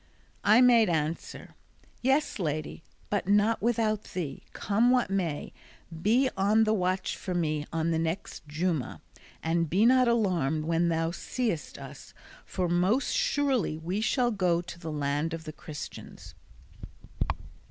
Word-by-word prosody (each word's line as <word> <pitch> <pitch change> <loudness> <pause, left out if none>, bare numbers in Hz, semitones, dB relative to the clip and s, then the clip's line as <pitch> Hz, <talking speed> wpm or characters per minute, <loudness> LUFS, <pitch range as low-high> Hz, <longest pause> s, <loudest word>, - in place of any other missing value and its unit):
I 215 +4 +6
made 235 -4 +6
answer, 160 0 -3 0.5
"Yes, 265 0 +1
lady, 155 -2 -3 0.3
but 205 -3 0
not 210 +3 +3
without 220 -2 +1
thee, 155 -7 -4
come 220 +4 +1
what 250 -5 +2
may: 175 -7 -2 0.5
be 240 +8 +3
on 205 +3 +3
the 215 0 +2
watch 185 -2 0
for 185 -2 -5
me 155 -3 -1
on 165 0 0
the 160 - +1
next 165 -1 -4
Juma, 150 - -2 0.4
and 165 0 0
be 195 +7 +3
not 255 +1 +5
alarmed 175 -10 +1
when 165 +1 +1
thou 165 0 0
seest 215 - -3
us; - - -11 0.3
for 180 -1 -1
most 185 +10 +2
surely 285 - +1
we 180 +6 -3
shall 240 +2 +2
go 180 -5 +1
to 170 -1 -8
the 165 -2 -5
land 145 +2 -1
of 165 - -9
the 155 - -7
Christians." 150 0 -9
180 Hz, 140 wpm, -28 LUFS, 160-220 Hz, 0.5 s, I